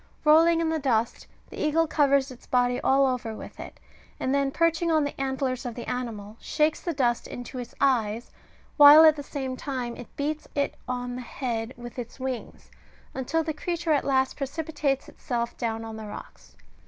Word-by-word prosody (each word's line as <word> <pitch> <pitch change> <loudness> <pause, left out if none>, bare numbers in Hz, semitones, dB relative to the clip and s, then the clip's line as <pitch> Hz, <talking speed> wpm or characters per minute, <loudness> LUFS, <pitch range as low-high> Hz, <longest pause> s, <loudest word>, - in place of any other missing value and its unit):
Rolling 330 +2 +6
in 325 - +1
the 320 0 0
dust, 235 -5 0 0.2
the - - -8
eagle 315 +2 +3
covers 280 -3 +2
its 250 - -14
body 245 0 +2
all 270 +1 +4
over 250 -4 -2
with - - -10
it, - - -9 0.4
and 260 - 0
then 280 -1 +2
perching 335 +3 +1
on 310 -2 +3
the 285 - -2
antlers 265 -1 -1
of 240 -2 -5
the 240 - -7
animal, 225 -4 -5
shakes 305 0 0
the 345 - -2
dust 245 -6 0
into 245 +1 -7
its 245 -1 -8
eyes, 235 -4 +1 0.5
while 295 +1 +10
at 310 -1 +7
the 290 - -6
same 270 -2 -4
time 255 -3 -4
it 245 - -9
beats 300 +2 -3
it 285 -1 0
on 245 -1 -3
the - - -5
head 240 -1 -4
with 240 +1 -8
its 240 +2 -8
wings, 260 -2 -6 0.4
until 320 +5 -1
the 315 0 -2
creature 340 +1 -2
at 290 - +3
last 265 -1 +1
precipitates 290 -1 -2
itself 235 -4 -3
down 225 -1 -2
the 220 -1 -7
rocks. 205 - -11
265 Hz, 185 wpm, -26 LUFS, 245-300 Hz, 0.5 s, while